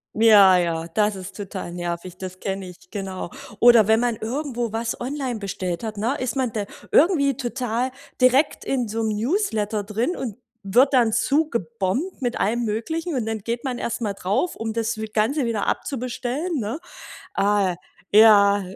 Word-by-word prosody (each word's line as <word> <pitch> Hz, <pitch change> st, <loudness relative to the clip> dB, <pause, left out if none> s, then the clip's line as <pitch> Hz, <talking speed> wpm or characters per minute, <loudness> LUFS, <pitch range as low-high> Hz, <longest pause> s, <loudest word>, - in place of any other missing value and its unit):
Ja, 205 Hz, -4 st, +7 dB
ja, 165 Hz, -2 st, -1 dB
das 210 Hz, +4 st, +1 dB
ist 185 Hz, -1 st, -8 dB
total 195 Hz, -3 st, -6 dB
nervig. 175 Hz, +1 st, -5 dB
Das 185 Hz, 0 st, -7 dB
kenne 195 Hz, -1 st, -4 dB
ich, 180 Hz, 0 st, -14 dB
genau. 190 Hz, -3 st, -5 dB, 0.3 s
Oder 235 Hz, -3 st, +7 dB
wenn 220 Hz, 0 st, +4 dB
man 240 Hz, -1 st, +1 dB
irgendwo 240 Hz, 0 st, -3 dB
was 225 Hz, 0 st, -2 dB
online 255 Hz, -2 st, -3 dB
bestellt 185 Hz, -2 st, -4 dB
hat, 215 Hz, -2 st, -5 dB
ne, 230 Hz, +7 st, 0 dB
ist 255 Hz, 0 st, -2 dB
man 260 Hz, -3 st, 0 dB
da 210 Hz, -2 st, -3 dB, 0.3 s
irgendwie 285 Hz, -6 st, +4 dB
total 250 Hz, -1 st, -2 dB, 0.3 s
direkt 255 Hz, +4 st, +3 dB
in 250 Hz, -3 st, -1 dB
so 225 Hz, +2 st, -2 dB
'nem 220 Hz, -, 0 dB
Newsletter 220 Hz, -, 0 dB
drin 225 Hz, -, -2 dB
und 235 Hz, -6 st, -5 dB, 0.3 s
wird 245 Hz, +9 st, +3 dB
dann 235 Hz, -4 st, +4 dB
zugebombt 240 Hz, -, -1 dB
mit 245 Hz, -2 st, -2 dB
allem 235 Hz, +4 st, +1 dB
Möglichen 315 Hz, +11 st, -2 dB
und 245 Hz, -4 st, -1 dB
dann 225 Hz, -1 st, -2 dB
geht 235 Hz, +3 st, -4 dB
man 260 Hz, -3 st, -3 dB
erst 235 Hz, 0 st, -3 dB
mal 210 Hz, -3 st, -1 dB
drauf, 200 Hz, -, -1 dB
um 225 Hz, 0 st, -4 dB
das 230 Hz, 0 st, -1 dB
wie 220 Hz, -, -3 dB
Ganze 225 Hz, +7 st, 0 dB
wieder 225 Hz, -3 st, -1 dB
abzubestellen, 265 Hz, +5 st, -2 dB
ne? 225 Hz, +7 st, -3 dB, 0.6 s
Ah, 200 Hz, -2 st, +2 dB, 0.4 s
ja. 205 Hz, -1 st, +7 dB
225 Hz, 170 wpm, -23 LUFS, 200-255 Hz, 0.6 s, Ja